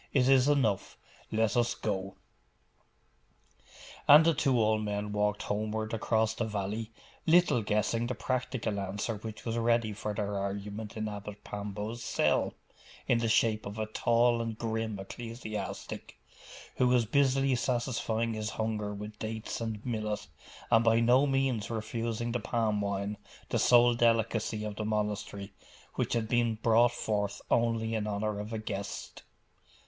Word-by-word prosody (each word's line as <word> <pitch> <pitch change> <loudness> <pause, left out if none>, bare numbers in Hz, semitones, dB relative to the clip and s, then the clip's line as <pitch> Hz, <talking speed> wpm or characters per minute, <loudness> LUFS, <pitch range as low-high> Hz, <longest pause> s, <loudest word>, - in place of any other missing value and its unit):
It 130 -3 +4
is 135 0 +5
enough. 120 -9 +1 0.3
Let 110 -1 +1
us 120 -1 +2
go.' 95 -2 -3 1.9
And 150 +3 +9
the 165 - +5
two 135 -4 +2
old 110 0 +2
men 105 0 -2
walked 105 0 0
homeward 110 +1 -2
across 110 0 +1
the 115 - -2
valley, 105 +1 -3 0.4
little 170 -7 +5
guessing 110 +2 0
the 125 - -2
practical 120 -3 -2
answer 100 +3 -3
which 105 +1 -8
was 115 0 -1
ready 115 -2 +2
for 105 0 -4
their 100 -1 -2
argument 100 +2 -5
in 110 0 -2
Abbot 105 0 -7
Pambo's 105 +3 -5
cell, - - +1 0.5
in 120 - +3
the 115 -1 0
shape 110 -1 +2
of 100 +2 -7
a 110 - -1
tall 120 +2 +2
and 115 -1 -4
grim 110 -2 -2
ecclesiastic, 115 +2 -6 0.6
who 125 - +4
was 125 -2 +3
busily 135 +2 +3
satisfying 120 -2 0
his 110 0 -3
hunger 110 -2 -2
with 105 +1 -8
dates 110 +1 -4
and 110 -2 -4
millet, 110 -3 -2 0.5
and 115 -1 +6
by 115 0 +4
no 125 +4 +4
means 135 -6 0
refusing 115 +1 -2
the 125 - -1
palm 110 -2 0
wine, 100 +1 -2 0.3
the - - +1
sole 120 0 +6
delicacy 115 -2 +1
of 105 -1 -5
the 110 - -2
monastery, 105 -2 -2 0.4
which - - -1
had 115 -2 0
been 120 -1 +2
brought 115 +2 +4
forth 105 -4 -2
only 115 -1 +2
in 110 -1 -1
honour 105 0 -2
of 105 +2 -6
a 110 - -2
guest. 100 -2 -5
110 Hz, 150 wpm, -30 LUFS, 105-120 Hz, 1.9 s, And